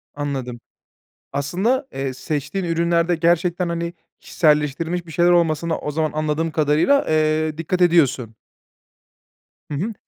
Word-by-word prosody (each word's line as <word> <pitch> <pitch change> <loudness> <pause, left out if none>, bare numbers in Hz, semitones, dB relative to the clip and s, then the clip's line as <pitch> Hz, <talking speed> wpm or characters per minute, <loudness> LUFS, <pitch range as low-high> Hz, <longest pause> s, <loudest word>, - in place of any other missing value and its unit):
Anladım. 135 -4 -4 0.7
Aslında, 205 - 0
eee, 135 -1 -3
seçtiğin 150 +8 -3
ürünlerde 170 +1 +1
gerçekten, 175 +2 +1
hani, 170 0 -3 0.3
kişiselleştirilmiş 155 +3 0
bir 160 - -11
şeyler 175 +3 +3
olmasına 170 -1 +1
o 150 - -4
zaman, 155 +1 -1
anladığım 155 +1 -1
kadarıyla, 155 - +2
eee, 155 0 +1
dikkat 175 +3 -2
ediyorsun. 140 -10 +2 1.3
Hı - - -7
hı. 200 +10 -2
160 Hz, 120 wpm, -21 LUFS, 150-175 Hz, 1.3 s, şeyler